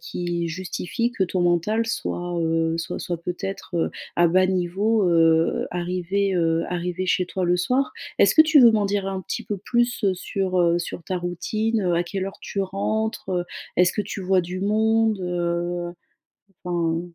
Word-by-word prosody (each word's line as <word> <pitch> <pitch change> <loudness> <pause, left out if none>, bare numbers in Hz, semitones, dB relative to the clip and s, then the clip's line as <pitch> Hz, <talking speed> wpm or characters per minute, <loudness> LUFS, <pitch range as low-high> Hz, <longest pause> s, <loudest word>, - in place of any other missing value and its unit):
qui 175 -1 -3
justifie 185 +7 -3
que 230 - -1
ton 185 0 -1
mental 175 +6 +1
soit, 175 -5 -3
heu, 165 0 +1
soit 165 - -4
soit 175 - -3
peut-être, 180 +1 -5
heu, 165 - +1 0.3
à 175 - +5
bas 185 +2 +4
niveau, 190 +3 +1
heu, 165 -1 +3
arrivé, 180 +3 -1
heu, 165 -1 +1
arrivé 180 +1 -3
chez 185 0 +1
toi 185 +1 -2
le 175 0 +2
soir. 255 +9 0 0.3
Est-ce - - +5
que 315 - +9
tu 315 -1 +4
veux 235 -2 +8
m'en 210 -2 +2
dire 200 -1 -1
un 195 -1 -3
petit - - -5
peu 205 - -3
plus 240 +4 0
sur, 185 0 -2
heu, 170 0 +3
sur 175 - -6
ta 185 - -2
routine, 215 +5 -1
heu, 180 -2 +1
à 170 - +2
quelle 190 +2 -4
heure 195 - -8
tu 200 - -4
rentres? 215 +3 -2 0.5
Est-ce 180 0 +4
que - - -1
tu 205 0 -6
vois 185 0 +3
du 180 +1 -5
monde, 220 +1 +2
heu, 175 0 -2 0.7
enfin 170 -2 0
185 Hz, 180 wpm, -23 LUFS, 175-205 Hz, 0.7 s, que